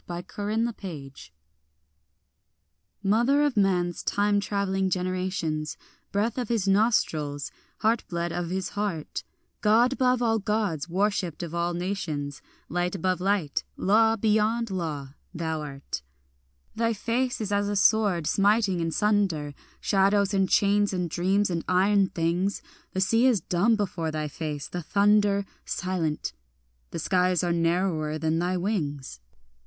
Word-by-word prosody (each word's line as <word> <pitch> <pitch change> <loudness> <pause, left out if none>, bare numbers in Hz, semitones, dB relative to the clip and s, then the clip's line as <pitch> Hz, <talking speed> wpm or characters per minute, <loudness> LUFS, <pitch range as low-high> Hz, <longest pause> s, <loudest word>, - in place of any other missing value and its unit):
MATER 175 0 -5
TRIUMPHALIS 205 - -4 1.7
MOTHER 240 +8 +3
of 290 -4 +1
man's 180 -4 +1
time 205 0 +1
travelling 195 -1 0
generations, 180 -4 -2 0.3
Breath 220 +5 0
of 245 - -3
his 220 -5 0
nostrils, 160 -9 +1 0.3
heartblood 175 -6 0
of 175 -1 -3
his 185 0 -2
heart, 200 -7 -3 0.4
God 230 +4 +4
above 255 -2 +2
all 225 -1 +2
Gods 205 -7 -1
worshipped 185 -3 0
of 170 -1 -6
all 170 0 -1
nations, 170 -7 -3 0.3
Light 175 +3 -1
above 185 0 -1
light, 195 -7 0
law 220 +3 +4
beyond 220 +1 +1
law, 150 -7 -4 0.2
thou 160 -1 -2
art. 140 - -6 0.7
Thy 230 +1 +1
face 245 +4 -1
is 210 -2 -3
as 205 0 +1
a 205 - -1
sword 200 -5 +3
smiting 200 +1 +2
in 165 -1 0
sunder 185 -7 +1 0.3
Shadows 200 +1 +2
and 195 -1 +2
chains 205 0 +3
and 180 -3 -2
dreams 190 +3 +1
and 165 -1 -2
iron 195 +2 +3
things; 175 +3 -1 0.3
The 190 - 0
sea 225 +6 +4
is 240 -6 +3
dumb 180 +7 +2
before 180 -6 -2
thy 155 -1 -2
face, 150 -1 -5
the 175 - -5
thunder 200 +2 +3 0.2
Silent, 175 -5 -2 0.6
the - - -6
skies 180 -1 +2
are 175 -1 +1
narrower 165 -2 0
than 160 +1 0
thy 180 +2 0
wings. 145 - -3
190 Hz, 135 wpm, -26 LUFS, 170-210 Hz, 1.7 s, God